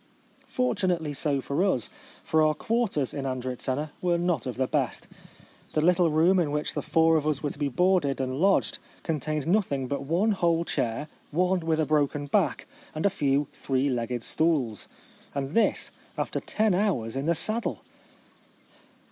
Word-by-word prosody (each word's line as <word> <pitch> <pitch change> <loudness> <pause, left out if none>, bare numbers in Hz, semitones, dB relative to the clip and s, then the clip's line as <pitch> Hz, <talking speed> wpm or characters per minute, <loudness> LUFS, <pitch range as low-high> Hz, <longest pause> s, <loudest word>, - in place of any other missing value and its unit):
Fortunately 185 - 0
so 140 0 0
for 140 +7 0
us, 130 - +1 0.3
for 160 - +2
our 155 0 +3
quarters 220 - 0
in 135 -1 -3
And 130 -1 -3
ritzena 130 +4 -3
were 175 -1 +2
not 175 -4 0
of 125 - -3
the 130 - +1
best. - - -1 0.7
The 155 - +2
little 175 +1 +4
room 165 +5 +4
in 165 -4 +1
which 150 +1 -1
the - - -2
four 165 0 +3
of 155 -1 -1
us 150 -1 0
were 145 - -1
to - - -10
be 145 -2 0
boarded 175 -2 +2
and 130 +1 -2
lodged 195 +3 +2 0.2
con 160 -3 -1
tained 155 0 -2
nothing 165 -8 +1
but 140 +2 -2
one 180 +9 +2
whole 170 -4 +1
chair, 120 +3 -2 0.2
one 180 +4 +2
with 160 -1 0
a 155 - +2
broken 145 -1 +1
back, 140 - +1 0.3
and 155 - -2
a 200 - +4
few 140 -1 +1
three 135 +1 0
legged 120 -1 -2
stools. 145 - 0 0.5
And 135 -1 -2
this 230 +7 +1 0.3
after - - -2
ten 215 -2 +1
hours 175 - 0
in 135 +3 -2
the 170 - +3
saddle 220 +7 -1
155 Hz, 175 wpm, -27 LUFS, 140-175 Hz, 0.7 s, little